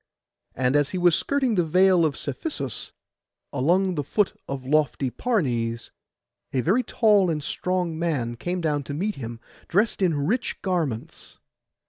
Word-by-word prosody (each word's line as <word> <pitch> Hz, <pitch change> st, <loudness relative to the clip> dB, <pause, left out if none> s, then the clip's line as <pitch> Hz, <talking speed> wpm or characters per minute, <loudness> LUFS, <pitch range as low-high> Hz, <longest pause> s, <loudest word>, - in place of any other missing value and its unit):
And 130 Hz, +2 st, +1 dB
as 145 Hz, -1 st, +3 dB
he 185 Hz, -, -3 dB
was 175 Hz, -1 st, +4 dB
skirting 270 Hz, -4 st, +1 dB
the 180 Hz, -4 st, +2 dB
Vale 180 Hz, +1 st, +4 dB
of 150 Hz, -2 st, -1 dB
Cephisus, 140 Hz, -, -4 dB, 0.6 s
along 185 Hz, +7 st, +2 dB
the 150 Hz, -4 st, -2 dB
foot 205 Hz, +8 st, +1 dB
of 135 Hz, -2 st, -5 dB
lofty 140 Hz, -2 st, +1 dB
Parnes, 120 Hz, -, -1 dB, 0.6 s
a 130 Hz, -, +1 dB
very 195 Hz, -, +2 dB
tall 210 Hz, -5 st, +3 dB
and 150 Hz, -3 st, -2 dB
strong 180 Hz, -1 st, -2 dB
man 135 Hz, -9 st, -1 dB
came 175 Hz, +8 st, -3 dB
down 150 Hz, -3 st, 0 dB
to 145 Hz, -, -5 dB
meet 205 Hz, +7 st, -1 dB
him, 115 Hz, -2 st, -6 dB, 0.3 s
dressed 205 Hz, +3 st, +1 dB
in 175 Hz, -4 st, +3 dB
rich 240 Hz, -, -1 dB
garments. 165 Hz, -, -3 dB
165 Hz, 150 wpm, -25 LUFS, 135-190 Hz, 0.6 s, was